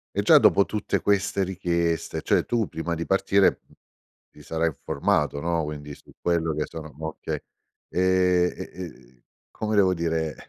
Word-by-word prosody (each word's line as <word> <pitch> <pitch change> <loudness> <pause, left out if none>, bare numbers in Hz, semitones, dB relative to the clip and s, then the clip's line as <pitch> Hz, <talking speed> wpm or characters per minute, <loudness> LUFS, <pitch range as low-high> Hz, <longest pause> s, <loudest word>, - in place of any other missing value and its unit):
E - - +2
già - - +7
dopo 100 - +5
tutte 105 - -2
queste 100 -1 +1
richieste, 85 -3 -1
cioè - - +2
tu 115 -4 0
prima 85 +1 -3
di 85 0 -4
partire, 95 0 +3
m - - -23 0.6
ti - - -16
sarai 80 0 -1
informato, 75 -1 -1
no. 85 0 0
Quindi 75 -1 -6
su - - -19
quello 85 -2 +1
che 75 0 -2
sono 80 -2 -9
okay. 80 0 -4 0.5
Ehm, 90 -1 +3
e - - -7
e 65 -9 -11 0.3
come 110 0 -2
devo 95 -2 +4
dire? 80 -2 -1
85 Hz, 160 wpm, -25 LUFS, 80-95 Hz, 0.6 s, già